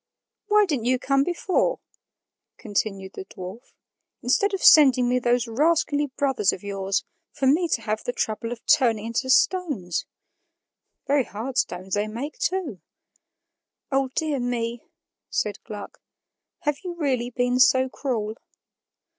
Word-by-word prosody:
"Why 420 0 +5
didn't 280 - -2
you 255 +1 +3
come 275 +2 +2
before," 360 - 0 0.8
continued 200 -3 -3
the - - -7
dwarf, 190 +9 -10 0.5
"instead 400 - +2
of 390 -3 -3
sending 260 -5 +7
me 250 +1 +2
those 240 0 +1
rascally 295 +3 +1
brothers 265 -8 +2
of 185 - -8
yours, 195 -1 -2 0.3
for 270 - -3
me 315 +7 +3
to 230 -8 -1
have 215 0 -2
the - - -2
trouble 230 0 -3
of 240 -1 -7
turning 225 -4 +3
into 230 +3 -2
stones? 265 - +1 1.0
Very 280 -2 +2
hard 245 +5 -3
stones 185 +2 -3
they 205 +1 +1
make, 250 +8 -6
too." 335 - -2 1.1
"O 270 0 +2
dear 305 -4 0
me!" 240 -1 -2 0.5
said 205 -2 -2
Gluck, 210 -3 -8 0.6
"have 295 -4 -1
you 355 -2 -5
really 260 -7 -1
been 245 0 0
so 260 0 +5
cruel?" 225 -5 -3
245 Hz, 140 wpm, -24 LUFS, 215-285 Hz, 1.1 s, sending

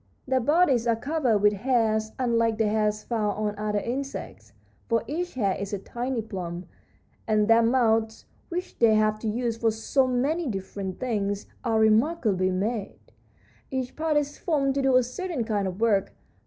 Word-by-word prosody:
Their 260 0 +2
bodies 270 -3 +3
are 230 - +3
covered 265 -2 +1
with 210 0 +5
hairs, 220 -1 +1
unlike 230 -3 +1
the 220 -1 +2
hairs 210 0 0
found 215 -4 -1
on 210 -1 -1
other 210 0 -1
insects, 220 - -5 0.4
for 230 0 +2
each 335 +7 -4
hair 200 -6 +1
is 200 +1 -5
a - - 0
tiny 240 +4 -4
plume. 180 -4 -6 0.6
And 215 -1 +2
their 225 0 +6
mouths, 225 -2 +1 0.2
which 360 +1 -5
they 225 -2 +5
have 215 0 +2
to 225 - -4
use 230 +1 -1
for 225 0 +2
so 225 +5 +1
many 280 +7 0
different 195 -3 -5
things, 205 -5 -2 0.2
are 225 -3 +1
remarkably 220 - +2
made; 200 +3 -2 0.7
each 260 -1 -3
part 315 -1 0
is 290 0 -2
formed 280 -5 +1
to 275 - 0
do 265 -1 +3
a 255 - +4
certain 285 +2 -3
kind 205 -3 -1
of 185 +1 -5
work. 220 -4 +2
225 Hz, 170 wpm, -26 LUFS, 210-260 Hz, 0.7 s, their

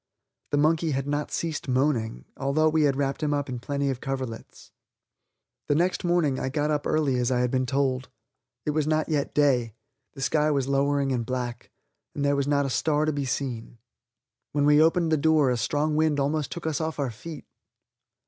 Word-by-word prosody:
The 145 - 0
monkey 155 +1 +2
had 135 0 -1
not 145 0 -2
ceased 160 -4 -3
moaning, 125 - 0
although 150 +4 +2
we 155 -1 +2
had 140 -2 +2
wrapped 140 +1 -1
him 150 -1 +1
up 145 -1 -2
in 125 -1 -4
plenty 140 +2 -1
of 130 - -6
coverlets. 130 -4 -6 1.0
The 145 - +2
next 175 +4 +1
morning 170 -6 +1
I 130 - -2
got 150 +2 0
up 145 -1 -1
early 145 -5 +1
as 125 0 +1
I 125 -1 +1
had 125 -1 0
been 130 -1 0
told. 130 -1 0 0.6
It 150 - +1
was 155 0 0
not 155 +1 +1
yet 145 -3 -1
day, 125 -7 +2 0.4
the 135 - -9
sky 150 +2 +2
was 140 -3 0
lowering 140 0 +1
and 125 -2 0
black, 125 -1 -4 0.5
and 145 - -1
there 140 0 +3
was 140 0 0
not 145 -1 +2
a - - -1
star 150 +2 +1
to 155 - 0
be 140 -1 -2
seen. 120 -3 -4 0.8
When 145 -1 +2
we 150 +1 +6
opened 165 +1 +3
the 155 - +4
door 150 -3 +3
a - - +1
strong 150 +6 0
wind 155 -2 +2
almost 145 +1 -1
took 170 - -6
us 160 -1 -1
off 160 0 -3
our 140 -4 -1
feet. 155 +9 -9
145 Hz, 205 wpm, -26 LUFS, 130-155 Hz, 1.0 s, we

